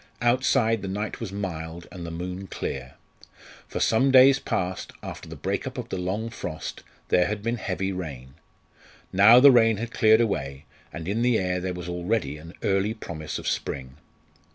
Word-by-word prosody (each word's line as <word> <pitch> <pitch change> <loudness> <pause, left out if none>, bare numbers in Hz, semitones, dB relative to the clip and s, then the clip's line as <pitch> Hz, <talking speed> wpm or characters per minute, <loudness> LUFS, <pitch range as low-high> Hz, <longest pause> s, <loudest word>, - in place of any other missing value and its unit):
Outside 120 -2 +2
the 100 - -5
night 105 +3 -4
was 115 -5 -5
mild, 85 -4 -5
and 90 - -8
the 85 - -5
moon 90 +3 -5
clear. 65 -6 -5 0.7
For - - -4
some 130 +5 +3
days 135 +1 +7
past, 90 0 -3
after - - -8
the - - -7
break - - -3
up - - -7
of - - -5
the - - -3
long 100 +6 -2
frost, 80 -8 -6 0.3
there 90 0 +4
had 105 -1 -4
been 115 +2 -1
heavy 95 -2 -2
rain. 70 -9 -7 0.8
Now 105 +6 +8
the 140 +2 +9
rain 115 -3 +5
had 115 +2 -5
cleared 110 -2 +5
away, 70 -11 -2 0.3
and 80 0 -7
in 105 +4 0
the 120 -1 +3
air 90 -1 -1
there 90 0 -3
was 90 0 -7
already 90 -3 -1
an 80 +3 -12
early 100 +2 +1
promise 80 -8 -6
of - - -6
spring. 65 0 -3
95 Hz, 180 wpm, -25 LUFS, 85-115 Hz, 0.8 s, the